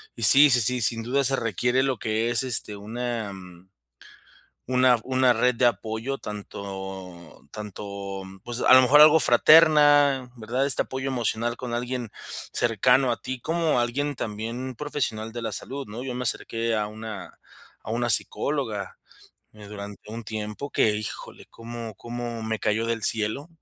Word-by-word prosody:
y 115 - -7
sí, 140 +6 +10
sí, 120 -1 +6
sí, 125 +2 +2
sin 115 +1 +2
duda 135 +4 0
se 135 +1 +4
requiere 120 +3 0
lo 135 -2 -1
que 110 +1 -1
es, 120 - +4
este, 115 -4 +2
una, 115 +1 -5
mm 90 -1 -14 1.0
una 125 -2 +3
una 130 -1 +2
red 125 +1 +1
de 125 - +1
apoyo, 115 +3 -2
tanto 95 -4 -9
tanto, 100 -2 -7 0.2
pues, 120 0 -4
a - - +3
lo 130 - +7
mejor 145 +4 +6
algo 155 +1 +7
fraterna, 145 -1 +5
¿verdad? 125 +5 -2
Este 140 - +2
apoyo 130 +1 -6
emocional 120 -2 -2
con 125 -2 -6
alguien 120 -1 -4 0.4
cercano 125 +3 +2
a - - -3
ti, 130 -1 -6
como 160 -4 0
alguien 140 +5 -2
también 115 +4 -5
profesional 115 -6 -4
de 120 +1 -7
la 110 -1 -4
salud, 135 +2 -5
¿no? 115 +4 -8
Yo 130 -2 -5
me 125 - -5
acerqué 115 -1 -1
a 105 -1 -1
una 110 0 -9 0.4
a - - -11
una 120 0 0
psicóloga, 110 -4 -2 0.6
eh, 105 -1 -13
durante 105 0 -10
un 115 0 -7
tiempo 105 +6 -6
que, 105 -1 +2
¡híjole!, 105 - -7
como 115 -1 -9
como 120 +1 -7
me 110 0 -3
cayó 110 +2 -1
del 115 -1 -1
cielo. 115 +8 +1
120 Hz, 165 wpm, -24 LUFS, 110-130 Hz, 1.0 s, sí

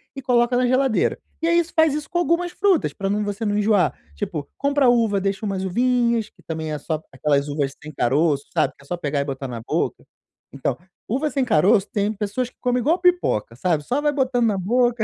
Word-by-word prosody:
e 270 - -6
coloca 245 -1 +2
na 250 0 +2
geladeira. 260 -1 +2 0.2
E 325 - +1
é 335 - +3
isso, 345 0 +1
faz 320 -3 +4
isso 300 -1 -4
com 345 - -1
algumas 350 +1 +1
frutas 380 -3 +1
para 195 -1 -3
não 210 +1 0
você 205 +1 -4
não 205 -1 0
enjoar. 210 -2 +2 0.2
Tipo, 145 - -4
compra 280 -1 +2
uva, 225 -4 +3
deixa 195 +2 -2
umas 195 -1 -2
uvinhas, 235 +2 +1
que - - -25
também 160 -1 -4
é - - -2
só 155 +1 -3
aquelas 140 +1 0
uvas 145 -1 -2
sem 155 - -8
caroço, 145 +2 +1
sabe, - - +1
que - - -18
é - - -19
só 175 - -3
pegar 145 -3 -1
e - - -2
botar 135 -1 -4
na 120 -2 -6
boca. - - -2 0.5
Então, 135 -2 -2 0.3
uva 275 +7 0
sem 275 -2 0
caroço 200 -1 +3
tem 210 0 0
pessoas 215 +4 -2
que - - -32
comem 250 0 +1
igual 320 +9 +2
pipoca, 350 - +1
sabe, 160 +1 0
só 255 - -1
vai 295 0 +2
botando 255 -3 +1
na 205 -3 +1
boca 240 +4 +1
215 Hz, 225 wpm, -22 LUFS, 160-255 Hz, 0.5 s, faz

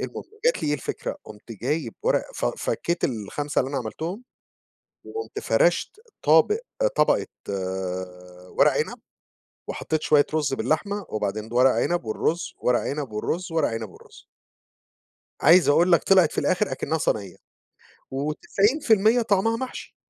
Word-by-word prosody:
المهم - - -5 0.2
جات - - +2
لي - - 0
إيه 150 - +2
الفكرة 140 - -4
قُمت 110 +2 -11
جايب 125 - -2
ورقة - - 0
ف - - -3
فكيت 170 - -2
ال5 130 +6 -2
اللي 130 - -2
أنا 140 0 -2
عملتهم 165 - -5 0.8
وقُمت 440 0 -6
فرشت 425 - +1 0.2
طابق 425 +1 +5 0.4
طبقة - - +3 1.3
ورق - - +6
عنب - - -2 0.7
وحطيت 155 -1 -2
شوية 145 -1 +4
رز 150 -3 +1
باللحمة 200 +8 -1
وبعدين 105 0 -3
ورق 130 +2 +5
عنب 175 +1 0
والرز 155 +10 -2
ورق 125 -1 +2
عنب 140 -5 -4
والرز 165 +11 -3
ورق 160 -2 +2
عنب 115 -2 -5
والرز. - - -17 1.2
عايز 170 +4 +6
أقول 170 +5 +4
لك 170 - +5
طلعت 185 -5 +5
في - - -7
الآخر 195 +3 +1
أكنها 160 - -1
صنية. 100 - -1 0.7
و90% 210 - +2
طعمها 225 +1 +2
محشي 260 +1 -7
155 Hz, 135 wpm, -24 LUFS, 125-195 Hz, 1.3 s, ورق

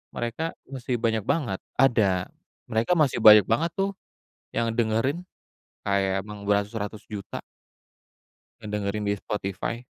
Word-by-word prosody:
mereka 120 +8 -3
masih 130 -2 -3
banyak 110 -2 +1
banget. 120 - 0 0.2
Ada, 105 -9 +3 0.4
mereka 115 +11 +2
masih 150 -7 +2
banyak 105 -1 +10
banget 140 +10 +1
tuh 195 0 0 0.6
yang 115 - +1
dengerin, 120 +9 +1 0.6
kayak 95 -1 +1
memang 105 -1 -9
beratus-ratus 105 +1 -1
juta 100 -3 -6 1.2
ngedengerin 105 -1 -3
di 100 0 +1
Spotify. 105 +5 -4
110 Hz, 115 wpm, -26 LUFS, 100-120 Hz, 1.2 s, banyak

